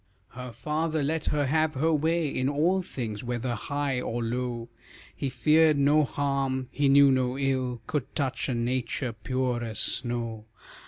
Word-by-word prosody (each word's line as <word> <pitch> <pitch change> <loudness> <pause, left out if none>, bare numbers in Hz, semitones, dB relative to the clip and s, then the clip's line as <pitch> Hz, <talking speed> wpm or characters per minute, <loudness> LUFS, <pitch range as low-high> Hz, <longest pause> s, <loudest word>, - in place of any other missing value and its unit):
Her 125 0 -8
father 155 +6 -1
let 155 +2 -1
her 145 -1 +1
have 155 +2 +1
her 160 +5 +2
way 160 +2 +1
In 130 -1 -1
all 165 +7 +2
things, 115 - -5
whether 120 0 -2
high 140 +2 -2
or 120 +1 -2
low; 120 0 -3 0.5
He 140 - -2
feared 155 +2 +4
no 145 +2 +4
harm; 135 -2 -1
he 140 -1 +2
knew 140 0 +7
no 130 0 +1
ill 130 -3 -1
Could 145 -1 -3
touch 140 -1 -1
a 125 - 0
nature 120 +1 -1
pure 125 +2 -2
as 110 -2 -5
snow. 120 -3 -2
130 Hz, 160 wpm, -27 LUFS, 120-145 Hz, 0.5 s, knew